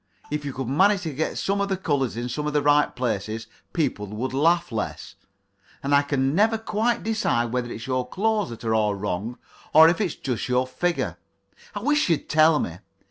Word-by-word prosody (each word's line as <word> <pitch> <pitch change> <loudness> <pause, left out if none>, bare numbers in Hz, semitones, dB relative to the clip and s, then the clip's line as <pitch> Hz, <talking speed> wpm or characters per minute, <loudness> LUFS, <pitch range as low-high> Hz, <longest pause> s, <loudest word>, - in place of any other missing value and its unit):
If 150 0 -2
you 140 - -3
could 130 -1 -5
manage 190 +9 +3
to 160 -3 -4
get 155 +4 -2
some 200 +1 0
of 200 - -1
the 190 - 0
colours 140 -10 -1
in 120 +1 -2
some 150 +5 -3
of 150 - -2
the 145 -1 +2
right 145 0 +3
places, 110 -2 -2 0.3
people 135 -11 -1
would 115 +6 -4
laugh 165 +2 +2
less. 110 -2 -4 0.7
And 140 +1 0
I 140 - +6
can 140 -1 0
never 220 +5 +3
quite 225 +2 -1
decide 120 - 0
whether 120 -1 -2
it's 110 +3 -6
your 130 -1 -2
clothes 215 +3 0
that 115 0 -9
are 110 -1 0
all 105 -2 +2
wrong, 105 +4 -3 0.4
or 160 +1 +9
if 175 +4 0
it's 185 -7 -1
just 125 -1 -3
your 125 +1 +2
figure. 175 +7 -2 0.6
I 205 - -3
wish 295 -1 +2
you'd 165 - 0
tell 155 0 +5
me. 85 - -3
140 Hz, 205 wpm, -24 LUFS, 120-175 Hz, 0.7 s, or